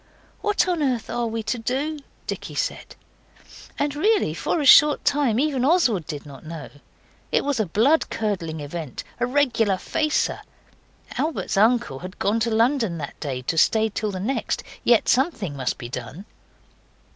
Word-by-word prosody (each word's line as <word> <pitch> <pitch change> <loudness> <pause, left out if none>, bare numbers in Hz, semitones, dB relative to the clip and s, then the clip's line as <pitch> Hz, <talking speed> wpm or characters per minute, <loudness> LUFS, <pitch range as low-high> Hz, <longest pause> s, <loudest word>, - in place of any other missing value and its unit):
'What 415 -3 +1
on 350 -3 0
earth 255 -7 -1
are 240 0 -1
we 225 0 -3
to 240 +2 -2
do?' 275 +7 -2 0.3
Dicky - - -5
said. - - -3 0.8
And 290 0 -1
really 420 +8 +2
for - - -1
a 295 - -1
short 295 +2 +7
time 275 -6 +2
even 275 -3 +1
Oswald 260 - +2
did 145 0 -6
not 140 -3 -12
know. 160 0 -8 0.6
It - - +2
was 285 -4 0
a 215 - +1
blood 240 - +3
curdling 175 -8 -3
event, 145 -2 -6 0.2
a 245 - +1
regular 245 -7 +2
facer. 305 +10 0 0.8
Albert's 315 -6 -1
uncle 220 - +2
had 185 +2 -9
gone 205 +4 +1
to 230 +1 0
London 225 -4 +1
that 145 -3 -7
day 130 -3 -4
to 165 +5 0
stay 220 +4 +3
till 215 0 -2
the 190 -2 -4
next. 240 +9 -2 0.2
Yet 235 -2 +4
something 235 - +1
must 130 -2 -2
be 120 - -7
done. 125 - -7
225 Hz, 165 wpm, -23 LUFS, 175-280 Hz, 0.8 s, short